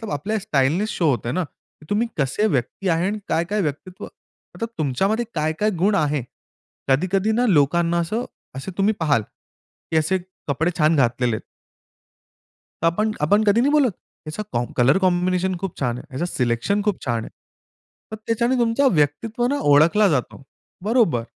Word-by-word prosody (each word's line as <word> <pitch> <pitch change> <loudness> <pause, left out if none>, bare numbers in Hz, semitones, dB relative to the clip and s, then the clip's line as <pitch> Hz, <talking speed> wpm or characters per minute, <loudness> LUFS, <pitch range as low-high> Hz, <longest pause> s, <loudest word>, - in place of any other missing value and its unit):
आपल्या 215 +10 -2
स्टाईलने 155 +4 +1
शो 170 -7 0
होते 120 -3 -1
ना, 185 +5 0
की 155 0 -18
तुम्ही 215 +3 +1
कसे 140 +9 +1
व्यक्ती 145 - -1
आहे? 165 +2 +1
आणि 210 +2 -2
काय-काय 185 +6 0
व्यक्तित्व? 175 +3 -5 0.5
मतलब 230 -1 -4
तुमच्यामध्ये 195 - 0
काय-काय 155 +7 0
गुण 205 +1 +3
आहे? 150 -6 +1 0.7
कधी-कधी 185 +9 +2
ना, 240 +3 +2
लोकांना 170 0 +3
असं, 215 +9 -2 0.3
असे 135 +8 -6
तुम्ही 200 +2 +3
पाहाल 145 -9 +2 0.7
की 160 - +2
असे 160 +5 +2 0.3
कपडे 160 +5 +1
छान 155 0 +3
घातलेले 125 -2 +1
आहेत. - - -7 1.4
तर - - +3
आपण 210 +6 +1
आपण 205 +9 +3
कधी 210 +2 +4
नाही 270 +4 +3
बोलत. 290 -5 +4 0.4
याचा 155 +7 -4
कॉम्ब 120 0 -2
कलर 130 +8 +4
कॉम्बिनेशन 185 0 +1
खूप 195 -3 -5
छान 125 -3 -1
आहे, 140 - -11
याचं 145 +7 -1
सिलेक्शन 125 - 0
खूप 205 -2 -2
छान 120 -3 0
आहे. - - -10 0.8
तर - - -3
त्याच्याने 235 +3 +1
तुमचा 235 +4 +2
व्यक्तित्व 180 - 0
ना, 285 +3 0
ओळखला 170 +9 +5
जातो. 140 -4 -2 0.4
बरोबर. 210 - +2
175 Hz, 160 wpm, -22 LUFS, 145-210 Hz, 1.4 s, ओळखला